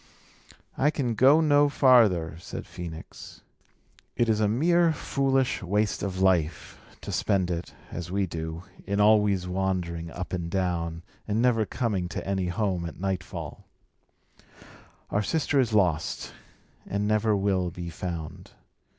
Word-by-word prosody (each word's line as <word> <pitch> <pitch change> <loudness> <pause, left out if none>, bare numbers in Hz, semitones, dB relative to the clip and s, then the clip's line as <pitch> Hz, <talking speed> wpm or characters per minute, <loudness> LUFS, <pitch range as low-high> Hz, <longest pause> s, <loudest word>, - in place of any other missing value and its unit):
"I 145 - +4
can 130 -6 -1
go 135 +7 +5
no 145 -2 +4
farther," 110 - +4
said - - -7
Phœnix. 85 -2 -9 0.7
"It 120 -1 +1
is 110 -1 +2
a 105 - +3
mere 165 +9 +3
foolish 135 -3 0
waste 105 +3 0
of 95 -2 -3
life, 85 -5 +1 0.2
to - - -6
spend 95 -4 +1
it, 85 0 -5 0.2
as 85 -1 -5
we 100 +1 0
do, 80 0 -5 0.2
in 100 +1 0
always 105 -3 +4
wandering 90 -3 -2
up 90 +3 -7
and 85 -2 -3
down, 85 -3 -2 0.2
and 105 +1 0
never 115 -3 +2
coming 100 -8 -2
to - - -5
any 95 -2 0
home 90 -2 -1
at 85 - -10
nightfall. 95 -3 -5 1.4
Our 105 - +1
sister 145 +4 0
is 120 -3 +2
lost, 90 -7 0 0.5
and 100 +1 -1
never 110 0 +2
will 95 -2 +1
be 85 0 -7
found. 85 -2 -6
95 Hz, 140 wpm, -27 LUFS, 90-110 Hz, 1.4 s, go